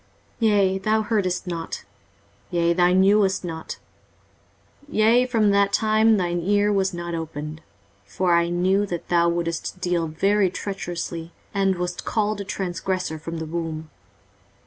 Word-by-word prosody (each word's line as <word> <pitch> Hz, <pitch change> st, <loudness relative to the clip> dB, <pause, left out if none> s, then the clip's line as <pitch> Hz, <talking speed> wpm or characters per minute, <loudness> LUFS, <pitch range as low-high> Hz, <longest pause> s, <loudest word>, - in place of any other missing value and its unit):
23:048:008 225 Hz, -, +4 dB
Yea, 195 Hz, -2 st, +3 dB
thou 215 Hz, +3 st, +1 dB
heardest 200 Hz, -5 st, 0 dB
not; 170 Hz, -2 st, -5 dB, 0.6 s
yea, 170 Hz, -1 st, +2 dB
thou 175 Hz, 0 st, +4 dB
knewest 195 Hz, +1 st, +3 dB
not; 160 Hz, -2 st, -6 dB, 1.1 s
yea, 235 Hz, +2 st, +4 dB
from 220 Hz, -4 st, +2 dB
that 200 Hz, 0 st, +3 dB
time 220 Hz, +1 st, +3 dB
that 185 Hz, -, +1 dB
thine 175 Hz, 0 st, -1 dB
ear 205 Hz, +3 st, +2 dB
was 195 Hz, -1 st, +1 dB
not 170 Hz, -1 st, -5 dB
opened: 155 Hz, -1 st, -5 dB, 0.4 s
for 175 Hz, -, 0 dB
I 170 Hz, 0 st, +3 dB
knew 190 Hz, +4 st, +1 dB
that 175 Hz, -3 st, -5 dB
thou 170 Hz, -1 st, +3 dB
wouldest 170 Hz, +1 st, -3 dB
deal 175 Hz, -2 st, 0 dB
very 195 Hz, +5 st, +2 dB
treacherously, 175 Hz, -3 st, -5 dB, 0.2 s
and 195 Hz, -2 st, +1 dB
wast 175 Hz, 0 st, -3 dB
called 215 Hz, -2 st, -1 dB
a -, -, -3 dB
transgressor 185 Hz, -3 st, -3 dB
from 165 Hz, +2 st, -6 dB
the 160 Hz, -, -4 dB
womb. 160 Hz, -1 st, -5 dB
180 Hz, 145 wpm, -23 LUFS, 170-200 Hz, 1.1 s, 23:048:008